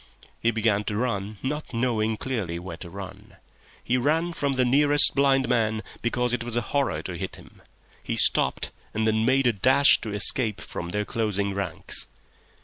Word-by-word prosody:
He 115 - +1
began 110 -2 +1
to 105 - -3
run—not 115 +5 -3
knowing 110 -2 0
clearly 105 -11 -3
where 85 -1 -7
to 90 - -9
run. 95 +1 -10 0.5
He 125 - +1
ran 160 +7 0
from 140 -4 -1
the 130 -1 +2
nearest 145 +3 +5
blind 135 -2 +2
man, 110 -3 0 0.2
because 120 0 0
it 125 -1 -1
was 120 -1 -3
a 120 - +1
horror 130 - 0
to - - -5
hit - - -5
him. - - -17 0.4
He - - -3
stopped, - - +3 0.2
and 110 0 0
then 110 0 +1
made 135 +2 +3
a 120 - +3
dash 130 +7 +5
to 110 - -5
escape 105 +1 +2
from 85 - -6
their 105 +3 -2
closing 100 -3 -2
ranks. 100 -2 -1
115 Hz, 175 wpm, -25 LUFS, 105-130 Hz, 0.5 s, nearest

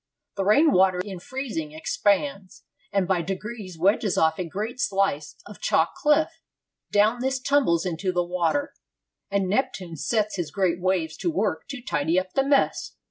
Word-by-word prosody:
The 195 - -1
rain 285 +10 +5
water 185 -2 +4
in 190 -3 -7
freezing 230 - -5
expands, 200 - -1 0.3
and 195 -2 +1
by 185 -2 +1
degrees 195 0 -6
wedges 200 +3 +2
off 160 +1 +2
a 180 - -1
great 215 +7 -4
slice 195 -9 0
of 205 - -12
chalk 160 0 +2
cliff; 310 - +1 0.5
down 215 +4 +3
this 265 +1 0
tumbles 255 - +2
into 180 +2 -1
the 180 -1 0
water; 180 - -1 0.6
and 200 -1 0
Neptune 185 -5 -1
sets 215 +6 -1
his 175 -4 -2
great 180 -3 0
waves 175 -4 0
to 180 - -1
work 165 -1 -1
to 270 -3 -7
tidy 165 - +1
up 185 0 -7
the 270 - +2
mess.' 275 0 +1
195 Hz, 165 wpm, -25 LUFS, 175-235 Hz, 0.6 s, rain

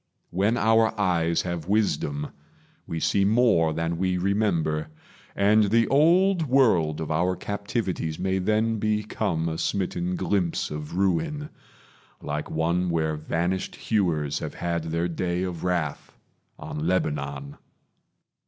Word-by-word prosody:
When 100 +6 +1
our 110 -1 +3
eyes 85 -4 +1
Have 85 -2 -4
wisdom, 95 -8 0 0.6
we 80 - -3
see 100 +4 +2
more 100 -7 +3
than 85 +1 -2
we 90 -1 +1
remember; 90 -6 0 0.5
And 105 +2 +4
the 115 +3 +3
old 170 +4 +4
world 95 - +3
of 80 0 -4
our 90 +4 +1
captivities 100 -5 -3
May 95 0 0
then 110 +3 +1
become 105 -5 -1
a 80 0 -3
smitten 90 -2 -1
glimpse 90 -3 -1
of 75 +2 -6
ruin, 150 - 0 0.7
Like 75 +1 -4
one 85 +3 0
where 80 -2 0
vanished 85 +4 -2
hewers 80 -9 0
have - - -6
had 85 -2 -2
their 85 +1 -1
day 90 +1 -2
Of 90 -3 -4
wrath 85 -5 -2 0.4
on 75 +2 -5
Lebanon. 70 -5 -2
90 Hz, 125 wpm, -25 LUFS, 80-105 Hz, 0.7 s, And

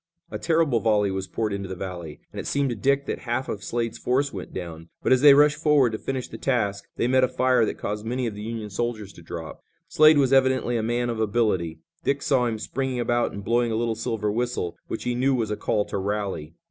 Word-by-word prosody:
A - - -4
terrible 160 -7 +2
volley 105 -3 +2
was 95 0 -3
poured 110 -2 -2
into 100 -1 -4
the 95 - -4
valley, 90 -5 -7
and - - -6
it - - -5
seemed 140 -2 +1
to - - -2
Dick 140 +6 +1
that - - -3
half 120 +1 -2
of 105 -1 -5
Slade's 115 -1 -2
force 135 +3 0
went 95 -3 -7
down, 85 -2 -7
but - - +4
as 130 - +3
they 145 -1 +9
rushed 145 +1 +5
forward 145 -6 +4
to 110 - -4
finish 130 -2 -3
the - - -9
task 100 -6 -1
they 120 - 0
met 130 +1 +3
a - - +5
fire 130 -2 +2
that - - -4
caused 105 +1 -4
many 125 +3 -2
of 115 - -2
the 105 - -8
Union 110 -1 -5
soldiers 110 -2 -3
to - - -14
drop. 80 -1 -8 0.2
Slade 155 0 +6
was 135 -2 +3
evidently 130 -2 +3
a 115 - +1
man 120 +2 0
of 115 - -4
ability. 100 -7 0 0.2
Dick 140 0 0
saw 130 -4 +2
him 115 -2 -2
springing 130 +3 -3
about 120 0 +1
and 100 - -7
blowing 120 +2 +1
a - - 0
little 115 0 0
silver 110 -2 -2
whistle, 120 -6 -2
which - - -4
he 125 - -1
knew 130 +2 +2
was 110 -4 -1
a - - 0
call 105 0 0
to 100 - -3
rally. 95 -6 -3
115 Hz, 245 wpm, -25 LUFS, 100-130 Hz, 0.2 s, they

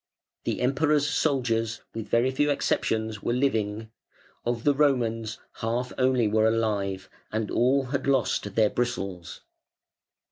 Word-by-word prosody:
The - - -1
"Emperor's 145 +3 +2
soldiers", 120 -7 0
with 110 -1 -6
very 120 +3 +3
few 145 +3 +1
exceptions, 110 -6 0
were 120 - -1
living; 110 -4 -1 0.5
of 120 -1 -2
the 145 - +4
"Romans" 120 -6 +1 0.2
half 120 +2 -2
only 130 -3 +2
were 110 +1 +3
alive, 105 -4 -1 0.2
and 110 -1 -2
all 130 +3 +3
had 135 +2 -3
lost 125 -6 +1
their 110 -2 +4
bristles. 100 -8 -3
115 Hz, 130 wpm, -26 LUFS, 110-135 Hz, 0.5 s, the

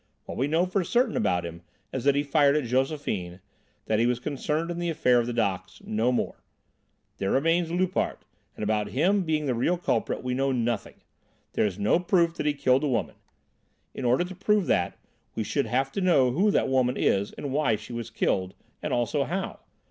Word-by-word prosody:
What - - -6
we 135 - 0
know 165 +4 +2
for 185 +1 0
certain 240 +5 +1
about 90 -1 +1
him 85 0 -8 0.3
is 130 -1 -3
that 140 -1 +4
he 145 - +2
fired 145 0 +3
at 150 - +1
Josephine, 125 - -1 0.5
that 110 -1 +1
he 120 - +3
was 125 -1 +1
concerned 150 +5 -2
in 170 - -4
the 175 0 -1
affair 125 -7 +3
of 120 - -1
the - - -2
docks 100 -6 -2
no 110 +3 +1
more. 125 - -1 0.8
There 95 - -1
remains 165 - +2
Loupart; 185 +1 -1 0.3
and - - -6
about 105 0 0
him 195 +7 +3
being 155 -3 0
the 130 - +1
real 130 +10 +1
culprit 125 -10 -1
we 125 0 -1
know 135 +1 +1
nothing. 120 -3 -1 0.6
There - - +2
is 95 -2 -5
no 105 +10 +2
proof 175 -2 +2
that - - -1
he 145 - +1
killed 130 -1 +3
the 150 - 0
woman. 125 -5 -1 0.8
In - - -6
order 125 +6 +3
to 180 +1 -7
prove 205 +1 +1
that 85 - 0 0.4
we 110 - -1
should 140 +4 -1
have 135 +4 0
to 200 - -3
know 140 -9 +4
who 190 +11 +2
that - - +2
woman 130 -1 +1
is 100 +1 +1
and 140 -2 -5
why 140 -6 +2
she 105 +3 -9
was 115 -1 -5
killed, 95 -4 -1 0.3
and - - -3
also 120 +4 +1
how. 190 +4 -3
135 Hz, 210 wpm, -27 LUFS, 115-165 Hz, 0.8 s, that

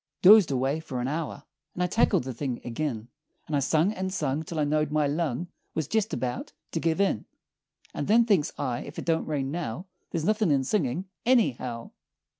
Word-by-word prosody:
"Dozed 200 -2 +9
away 135 +3 0
fer 135 -5 -5
an 125 - -1
hour, 150 -1 -3 0.3
And 180 - 0
I - - +3
tackled 180 - +2
the 130 0 -5
thing 125 0 -3
agin; 120 -2 -3 0.4
And 150 - -2
I - - +3
sung, 155 +8 +2
and 190 -2 -3
sung, 150 -5 -1
Till 160 +1 -6
I - - +3
knowed 150 +1 +1
my 150 0 +2
lung 155 +2 -1 0.3
Was 160 -4 -1
jest 220 0 0
about 125 -1 -3 0.2
to 165 - -1
give 160 +2 0
in; 200 - +1 0.7
And - - -3
then, 230 +3 +5
thinks 195 -10 +2
I, 120 -1 -2
ef 145 - -10
it - - -5
don't 165 -1 +1
rain 140 -3 -1
now, 165 0 -4 0.2
There're 165 - -2
nothin' 215 -2 +2
in 140 -2 +3
singin' 165 - 0 0.2
anyhow. 130 - +1
155 Hz, 200 wpm, -27 LUFS, 135-180 Hz, 0.7 s, Dozed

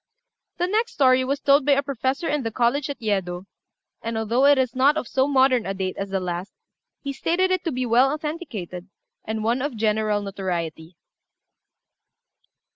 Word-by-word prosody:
The 350 - +1
next 435 +5 0
story 260 -2 +4
was 275 +2 -1
told 280 0 +4
by 285 +1 +4
a 280 +1 +2
professor 275 +3 -2
in 295 -1 0
the 225 - -2
college 245 +6 0
at 285 - -5
Yedo, 190 -4 -2 0.6
and, 230 0 -3
although 230 +4 +1
it 285 0 +6
is 255 -2 0
not 280 +4 +4
of 280 - -3
so 265 +1 +1
modern 260 -5 +3
a 195 - -3
date 190 -1 -3
as 195 0 -4
the 195 0 -1
last, 180 +1 -4 0.5
he 280 -1 -3
stated 360 +7 0
it 370 -2 0
to 330 - 0
be 255 0 -2
well 245 +3 +4
authenticated, 285 - -5 0.4
and 220 0 -3
one 235 +3 +1
of 275 -4 -3
general 215 -1 +1
notoriety. 175 -4 -4
255 Hz, 180 wpm, -23 LUFS, 205-280 Hz, 0.6 s, it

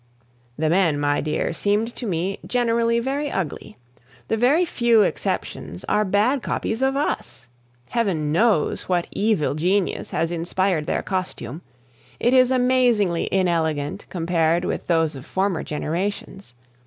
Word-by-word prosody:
The 155 +1 0
men, 165 -3 +2
my 145 0 +1
dear, 155 +2 -1
seemed 210 +6 0
to 240 - -4
me 185 +2 -2
generally 235 -1 +1
very 275 +4 -2
ugly. 180 - -4 0.5
The - - +2
very 270 +10 +3
few 235 -8 +3
exceptions 90 - -3
are 210 - +2
bad 215 +7 +2
copies 225 +1 -2
of 265 0 +2
us. 275 - -3 0.4
Heaven 185 -11 0
knows 185 -1 +1
what 175 -2 +1
evil 205 -9 +1
genius 180 +6 0
has 165 +1 -1
inspired 175 -1 -1
their - - -1
costume; 180 - -4 0.6
it 240 - +2
is 255 -1 +6
amazingly 245 -8 +2
inelegant 165 -3 0
compared 170 0 +1
with - - -3
those 165 -3 +1
of 135 - -8
former 190 +2 -1
generations. 180 0 -4
190 Hz, 135 wpm, -23 LUFS, 165-230 Hz, 0.6 s, is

